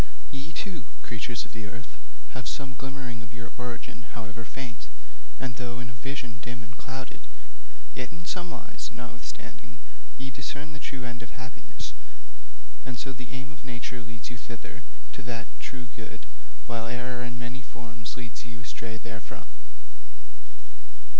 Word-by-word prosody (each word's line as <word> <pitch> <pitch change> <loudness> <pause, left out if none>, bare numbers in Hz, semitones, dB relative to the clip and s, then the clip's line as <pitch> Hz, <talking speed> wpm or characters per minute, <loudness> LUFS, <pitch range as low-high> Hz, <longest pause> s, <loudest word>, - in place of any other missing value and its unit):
'Ye, 140 +4 +1
too, 170 - +3 0.2
creatures 115 -2 +4
of - - -8
earth, 115 +3 -1 0.4
have 130 - +2
some 135 -2 +3
glimmering 130 -2 +1
of 115 +1 -4
your 115 0 -1
origin, 125 0 +1 0.2
however 110 0 +1
faint, 120 +1 -1 0.5
and 125 -3 +3
though 120 0 +3
in 120 -1 +1
a - - -3
vision 125 -4 +2
dim 120 0 +1
and 115 0 -5
clouded, 130 +1 0 0.7
yet 125 - +2
in 170 +1 -3
some 180 -1 +4
wise, 195 +5 0
notwithstanding, 120 0 -2 0.4
ye 135 0 +1
discern 145 +3 +2
the 145 - -1
true 130 -2 +2
end 120 0 +1
of 120 - -2
happiness, 130 - -1 0.9
and 125 - +1
so 135 +2 +3
the 125 -1 -3
aim 135 +3 +1
of 155 - -8
nature 125 -1 +1
leads 115 +1 -1
you 120 - -2
thither 120 0 -2 0.3
to - - -1
that 120 -1 +3
true 130 -2 0
good 110 -9 -2 0.4
while 115 - +4
error 125 +1 +4
in 120 0 +2
many 120 +2 +1
forms 115 -3 -2
leads 120 -1 0
you 120 -1 -2
astray 115 -1 +1
therefrom. 115 0 -2
125 Hz, 155 wpm, -36 LUFS, 115-130 Hz, 0.9 s, creatures